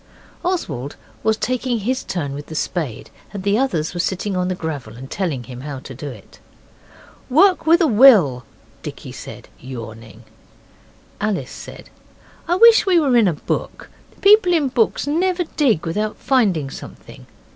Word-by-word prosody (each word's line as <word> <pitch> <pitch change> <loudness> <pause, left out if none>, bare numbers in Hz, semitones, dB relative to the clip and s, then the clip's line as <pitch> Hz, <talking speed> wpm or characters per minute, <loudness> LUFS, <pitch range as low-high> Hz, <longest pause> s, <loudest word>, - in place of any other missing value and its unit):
Oswald 150 - -3 0.3
was 220 0 +1
taking 255 0 -1
his 255 +5 -1
turn 145 -7 -3
with 145 +1 -7
the 160 - -8
spade, 150 -7 -3 0.2
and 200 -2 -6
the 200 +1 +2
others 175 - 0
were 175 - -5
sitting 190 +2 -2
on 180 0 0
the 185 - -1
gravel 145 -10 -6
and 130 +2 -10
telling 160 -10 -2
him 125 0 -9
how 145 0 -6
to 130 +1 -10
do 140 +3 -7
it. 110 -7 -13 0.9
'Work 355 +5 +4
with 335 +3 +5
a - - +5
will,' 210 - +6 0.4
Dicky - - -8
said, - - -10
yawning. 115 -3 -9 1.0
Alice 210 -2 -2
said, - - -11 0.6
'I 350 - +2
wish 455 +1 +6
we 360 -3 +5
were 275 -6 +2
in 230 -4 +5
a 175 - +2
book. 145 - -5 0.3
People 400 -3 +6
in 295 -5 +1
books 240 -2 +1
never 355 +5 0
dig 235 - +2
without 210 +6 -2
finding 195 - +1
something. - - -11
195 Hz, 160 wpm, -20 LUFS, -, 1.0 s, will